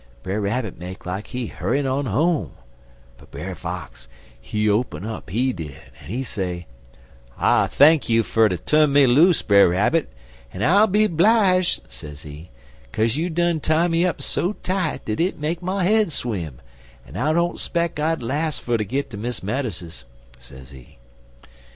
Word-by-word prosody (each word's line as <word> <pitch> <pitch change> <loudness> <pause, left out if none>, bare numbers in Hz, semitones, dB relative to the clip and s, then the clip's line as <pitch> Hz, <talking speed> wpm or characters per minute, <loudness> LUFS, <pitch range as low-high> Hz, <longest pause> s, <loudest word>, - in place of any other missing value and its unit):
Brer 100 +3 -2
Rabbit 110 0 -2
make 90 +1 -8
like 95 +3 -4
he 125 -1 -4
hurr'in' 140 0 -1
on 135 +1 -1
home, 155 - 0 0.7
but - - -17
Brer - - -6
Fox, - - -7 0.3
he 105 - -1
open 105 -1 0
up, 110 -4 -6
he 125 +7 0
did, 75 - -7 0.2
en - - -13
he 120 +9 -3
say: 90 -7 -4 0.7
"'I - - +3
thank 150 0 +4
you 115 0 +3
fer 110 0 +3
ter 90 - -2
tu'n 150 - +3
me 140 0 +6
loose, 155 +8 +4
Brer 100 -3 +5
Rabbit, 105 - +1 0.4
en 95 - -4
I'll 200 - +5
be 215 +2 +3
'blije,' 185 0 +3
sezee, 75 +5 -10 0.4
''caze 110 - 0
you 165 +4 -1
done 170 0 +1
tie 160 +3 +2
me 165 0 +1
up 180 -2 -1
so 180 +4 -1
tight 185 -4 -2
dat 110 - -3
it 180 +3 0
make 160 +3 -3
my 185 +1 -1
head 215 -1 +3
swim, 85 - -4 0.5
en - - -13
I 145 +6 +1
don't 170 +2 0
speck 170 -2 -1
I'd 155 -3 0
las' 150 +6 -1
fer 120 -1 -1
ter 105 - -1
git 130 +8 -3
ter 105 - -7
Miss 120 0 -4
Meadows's,' 95 - -4 0.3
sezee. 65 0 -14
130 Hz, 170 wpm, -22 LUFS, 100-165 Hz, 0.7 s, me